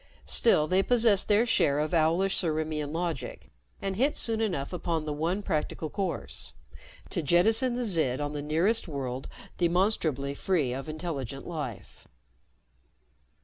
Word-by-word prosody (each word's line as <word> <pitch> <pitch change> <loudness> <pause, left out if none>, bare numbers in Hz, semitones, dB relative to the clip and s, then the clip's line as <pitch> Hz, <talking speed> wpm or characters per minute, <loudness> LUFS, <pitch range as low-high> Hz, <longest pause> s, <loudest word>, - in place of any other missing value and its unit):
Still 160 -10 +3
they 185 +5 +3
possessed 225 -3 +3
their 210 +3 +4
share 145 -11 +2
of 155 +4 -1
owlish 170 +4 +2
Ciriimian 155 -3 -2
logic 160 -6 -4 0.3
and 195 -1 -1
hit 270 +8 +1
soon 225 -1 0
enough 180 -9 -2
upon 165 -3 -2
the 150 - -2
one 170 +7 -1
practical 155 -2 -2
course 165 - -4 0.6
to - - 0
jettison 220 - +4
the 250 - -1
Zid 160 - +1
on 145 0 -2
the 145 -1 -4
nearest 170 +11 +1
world 135 -4 -4 0.3
demonstrably 170 -6 +1
free 145 -5 0
of 135 +4 -5
intelligent 145 -5 -5
life. 150 - -7
165 Hz, 140 wpm, -28 LUFS, 145-195 Hz, 0.6 s, their